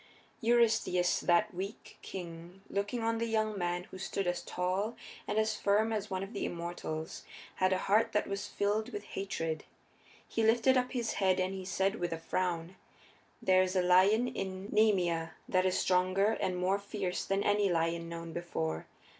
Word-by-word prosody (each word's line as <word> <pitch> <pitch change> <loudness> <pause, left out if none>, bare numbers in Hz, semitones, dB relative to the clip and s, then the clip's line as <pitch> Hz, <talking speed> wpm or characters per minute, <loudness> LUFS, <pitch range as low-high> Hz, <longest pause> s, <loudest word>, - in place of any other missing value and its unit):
Eurystheus, 225 -6 +3
that 185 +4 +2
weak 195 +5 -7
king, 175 +1 -8
looking 205 +4 -1
on 230 0 +1
the 230 - 0
young 215 -1 0
man 175 -1 -1
who 190 - -8
stood 195 +1 -2
as 175 0 0
tall 185 +6 -1 0.3
and - - -1
as 220 0 +2
firm 215 +2 +2
as 210 -1 -2
one 190 0 -2
of 195 +4 -8
the 205 - -3
immortals, 170 -2 -4 0.3
had 185 0 +3
a 185 - +3
heart 215 +3 +3
that 210 - +1
was 200 0 -4
filled 210 +3 0
with 205 - -5
hatred. 165 -6 -3 0.6
He 225 - -1
lifted 230 +4 +4
up 250 0 +1
his 235 -3 -1
head 190 -1 +3
and 185 +1 0
he 190 -1 -6
said 195 +2 0
with 175 -3 -2
a - - -3
frown: 175 +1 -2 0.7
"There 185 0 +5
is 185 0 0
a 185 - +3
lion 190 +7 +5
in 190 -2 -5
Nemea 180 -7 +2
that 185 0 +2
is 185 - +1
stronger 185 +3 +3
and 185 -4 -1
more 185 +2 +1
fierce 200 -2 -3
than 195 +1 0
any 205 -1 +3
lion 165 0 0
known 165 -1 -6
before. 80 - -3
190 Hz, 180 wpm, -32 LUFS, 175-210 Hz, 0.7 s, There